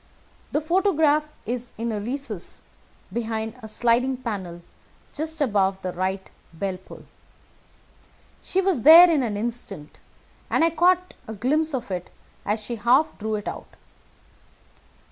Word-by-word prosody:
The 295 - 0
photograph 315 -3 +2
is 245 +1 -4
in 230 +1 -2
a 210 - -2
recess 230 -4 -4 0.5
behind 220 -1 -3
a 220 - -8
sliding 240 +4 +1
panel 190 -8 -6 0.5
just 315 +1 -3
above 195 -7 +1
the 185 -1 -3
right 190 +1 -2 0.2
bell 185 +3 -3
pull. 185 - -14 1.4
She 380 - 0
was 370 -10 +1
there 330 +6 +10
in 305 -4 +2
an 220 -5 -2
instant, 205 -8 -6 0.5
and - - +2
I 330 - +4
caught 360 +2 +2
a 220 - -6
glimpse 295 +8 0
of 245 -5 -5
it 180 -1 -4 0.4
as 210 +2 0
she 225 +1 -6 0.4
drew 220 0 -2
it 210 - -5
out. - - -7
235 Hz, 135 wpm, -24 LUFS, 205-300 Hz, 1.4 s, there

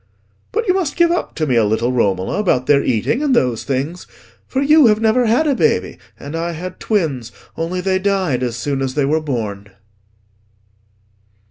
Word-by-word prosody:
"But 455 0 -2
you 365 - +4
must 355 -7 -1
give 340 -1 +3
up 350 - -2
to 155 - -1
me 130 -4 0
a 115 - +4
little, 110 +4 0
Romola, 100 - 0
about 150 -11 +1
their 140 0 +3
eating, 130 - 0
and 285 -4 +2
those 125 - +1
things. 140 +6 -3 0.4
For 265 - -2
you 295 0 +5
have 210 -1 +3
never 225 +2 +2
had 240 +8 +2
a 290 - +2
baby, - - 0 0.2
and 145 +3 -7
I 170 +1 -2
had 180 +3 -7
twins, 145 - -1 0.2
only 170 +3 -3
they 190 0 0
died 190 -9 0
as 120 -2 -2
soon 135 +3 -2
as 130 -1 -2
they 145 - +1
were 155 +3 +1
born." 105 -8 -4
160 Hz, 190 wpm, -18 LUFS, -, 0.4 s, you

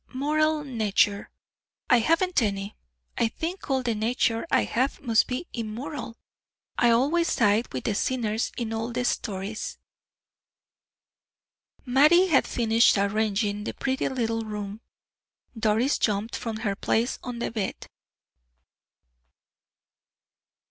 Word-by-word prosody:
"Moral 305 +2 +1
nature 210 -5 +1 0.6
I 245 - +5
haven't 330 +6 +2
any. 200 -1 -2 0.4
I 230 - +3
think 335 - -5
all 265 -1 +1
the 235 -2 0
nature 225 +3 0
I - - +3
have 260 +4 -1
must 230 -5 +2
be 255 +7 -3
immoral; 235 +3 -5 0.6
I 240 - +3
always 290 +9 +3
side 220 0 +2
with 130 - -4
the - - 0
sinners 225 0 -1
in 230 -2 -3
all 225 +2 -3
stories." 205 -2 -3 2.1
Mattie 305 +9 +5
had 280 -5 +3
finished 230 -1 +3
arranging 205 0 0
the - - -5
pretty 265 -1 -1
little 230 -3 -1
room. 210 -1 -6 0.7
Doris 225 +4 +1
jumped 210 +1 0
from 225 -2 -4
her 200 -1 0
place 230 +5 0
on 245 -1 -5
the 235 - -3
bed. 215 -4 -4
230 Hz, 115 wpm, -26 LUFS, 215-265 Hz, 2.1 s, I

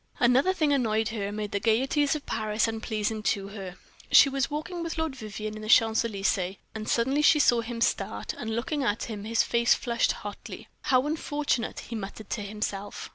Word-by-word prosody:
Another 255 +8 +4
thing 310 -6 +1
annoyed 220 -4 +1
her 210 -3 -3
and 205 +1 -5
made 210 -1 -3
the 200 - 0
gayeties 265 +7 +2
of 300 - -6
Paris 215 0 0
unpleasing 220 -1 -2
to 200 -2 -1
her. 195 -3 -7 0.4
She 275 - +8
was 275 0 -1
walking 310 +4 -4
with 335 -1 -4
Lord 320 -4 -1
Vivianne 215 -2 -6
in 215 - -7
the 215 - -7
Champs 225 -1 +5
Elysees, 195 -4 -1 0.2
and 220 0 -5
suddenly 265 +5 +2
she 300 +1 +6
saw 240 -5 +4
him 230 0 -6
start, - - -1
and 220 0 -4
looking 285 +5 -2
at 220 -3 0
him, 210 -3 -6
his 225 +1 +2
face 235 -1 +3
flushed 235 -1 0
hotly. 205 -1 -8 0.2
"How 260 -2 +3
unfortunate!" 295 -5 -1
he 235 - -7
muttered 210 0 -7
to 220 - -2
himself. 205 -1 -5
225 Hz, 195 wpm, -27 LUFS, 215-270 Hz, 0.4 s, She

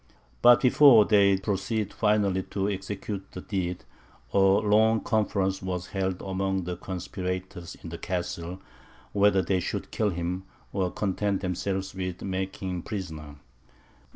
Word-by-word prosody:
But 120 0 +7
before 125 -4 +7
they 100 -2 +5
proceeded 100 +2 -2
finally 100 -3 +2
to 100 -1 -1
execute 95 0 -5
the - - -6
deed, 90 -3 -3 0.5
a - - +4
long 105 +3 +4
conference 100 -4 0
was 90 -1 -4
held 95 -2 -2
among 95 0 -1
the 90 +1 -4
conspirators 90 -1 -5
in 85 - -6
the 85 - -7
Castle, 90 0 -4 0.5
whether 100 -2 +4
they 95 +1 +1
should - - -4
kill 110 - +1
him, 90 +1 -3 0.3
or 95 -2 0
content 100 0 -1
themselves 95 +1 -2
with 90 -2 -5
making 95 0 -3
him 90 -1 -3
prisoner. 80 -9 -6
95 Hz, 135 wpm, -27 LUFS, 90-100 Hz, 0.5 s, But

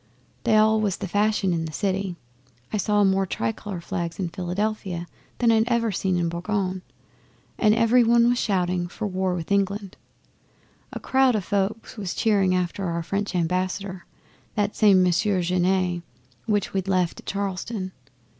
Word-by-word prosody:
They 220 -2 +4
all 215 0 +4
was 200 -3 0
the 195 - -4
fashion 205 -1 +1
in 165 -1 -1
the 160 - -6
city. 190 +1 -1 0.6
I - - +1
saw 205 0 +2
more 195 0 +2
tricolour 175 - -3
flags 170 -2 -4
in 185 -3 -2
Philadelphia 185 0 -3 0.3
than 235 -2 +3 0.2
ever 235 -1 +2
I'd 195 - -3
seen 185 -2 0
in 170 -1 +1
Boulogne, 185 +2 -2 0.8
and 215 -1 +4
every 230 +2 +4
one 235 0 +4
was 245 0 +2
shouting 180 -3 0
for 215 +5 -5
war 185 -2 -1
with 170 +1 -6
England. 200 0 0 0.9
A - - -5
crowd 265 -2 +3
o' - - +2
folk 200 +5 -2
was 190 -3 -4
cheering 195 -4 +2
after 180 +2 -1
our 170 -1 -2
French 200 +3 -2
Ambassador 185 +2 -2 0.5
that 205 0 0
same 195 -4 +5
Monsieur 180 +1 +2
Genet 180 0 +1 0.5
which 205 -3 0
we'd 190 -1 -1
left 185 -3 +1
at - - -15
Charleston. 195 0 -3
195 Hz, 160 wpm, -24 LUFS, 180-210 Hz, 0.9 s, same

